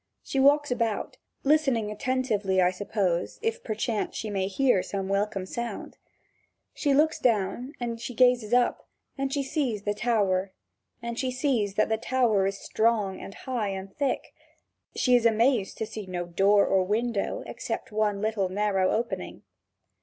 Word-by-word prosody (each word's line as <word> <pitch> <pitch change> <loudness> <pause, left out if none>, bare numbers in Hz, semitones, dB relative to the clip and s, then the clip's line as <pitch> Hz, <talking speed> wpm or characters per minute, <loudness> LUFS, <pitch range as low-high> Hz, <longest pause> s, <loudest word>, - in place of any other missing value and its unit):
She 270 - -2
walks 290 +1 +4
about, 230 -3 -1 0.3
listening 270 -8 +2
attentively, 210 -5 0
I 180 0 +4
suppose, 185 -2 -1
if 455 +1 -1
perchance 220 0 -2
she 215 - -4
may 190 -2 0
hear 225 0 +2
some 195 0 -4
welcome 195 -1 -1
sound. 235 +5 -6 0.7
She 290 - 0
looks 305 +3 +3
down 235 +4 0
and 235 -2 -4
she 240 0 -6
gazes 245 -3 +3
up, 245 0 +2 0.3
and 275 -1 -2
she 280 0 0
sees 260 -7 -2
that 205 0 -1
the 225 +2 -1
tower 230 -7 +2
is 195 0 -3
strong 215 -4 0
and 195 - -9
high 245 -5 -3
and 195 0 -6
thick. 280 -2 -2 0.6
She 250 -1 +3
is 235 -1 +5
amazed 230 -1 +2
to 220 - -2
see 215 -2 -7
no 175 -1 -3
door 195 +4 +4
or 190 -1 +3
window, 230 - -1
except - - -5
one 210 -1 0
little 215 -3 0
narrow 195 -1 +1
opening. 235 +1 -3
220 Hz, 145 wpm, -27 LUFS, 195-250 Hz, 0.7 s, is